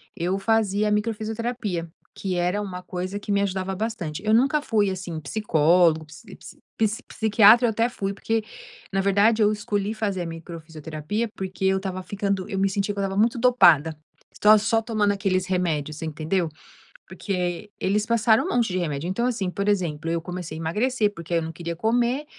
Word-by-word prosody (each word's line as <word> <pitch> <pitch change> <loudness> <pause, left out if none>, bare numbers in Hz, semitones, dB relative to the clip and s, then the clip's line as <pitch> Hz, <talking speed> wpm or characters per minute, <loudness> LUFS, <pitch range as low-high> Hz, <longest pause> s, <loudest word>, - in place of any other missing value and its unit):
eu 180 +1 -1
fazia 210 0 +1
a - - -1
microfisioterapia, 215 -3 -2 0.3
que 190 -2 -3
era 180 +3 0
uma 185 -3 -6
coisa 185 +2 -4
que 205 - -5
me 200 0 +2
ajudava 190 -1 -2
bastante. 190 -7 -4
Eu 215 - +3
nunca 270 +6 +3
fui, 215 -8 +1
assim, 185 -4 -5
psicólogo 160 -1 +2
psi 170 +7 -13 0.4
psi 220 0 0
psiquiatra 220 +2 +5
eu - - +1
até 225 +2 +1
fui 200 -5 -3
porque, 225 +2 -1 0.5
na 195 - 0
verdade, 205 +3 +3
eu 210 0 +4
escolhi 205 0 -2
fazer 205 -4 -2
a - - -5
microfisioterapia, 165 +4 -5
porque 190 0 -5
eu 190 0 +3
estava 190 -1 -4
ficando 200 -1 -2
eu 195 - -2
me 195 0 +2
sentia 200 +1 -1
que 200 - -6
eu - - 0
estava 195 0 -1
muito 230 +3 +3
dopada. 170 - +5 0.4
Estava 215 +1 +6
só 225 +2 +1
tomando 215 -3 +1
aqueles 190 -2 0
remédios, 155 -5 -1
entendeu? 160 +2 -1 0.6
Porque 180 +2 -3
eles 205 +2 +1
passaram 225 -1 +3
um - - -3
monte 240 -2 +2
de 185 - -1
remédio. 155 -3 -2
Então, 235 +6 -1
assim, 225 -7 -1
por 200 +2 -3
exemplo, 165 -6 0
eu 170 0 -1
comecei 175 -2 -6
a - - -6
emagrecer 210 +6 0
porque 170 -2 -7
eu 165 - +2
não 160 0 -5
queria 170 +1 -5
comer 240 - +1
195 Hz, 185 wpm, -24 LUFS, 175-215 Hz, 0.6 s, Estava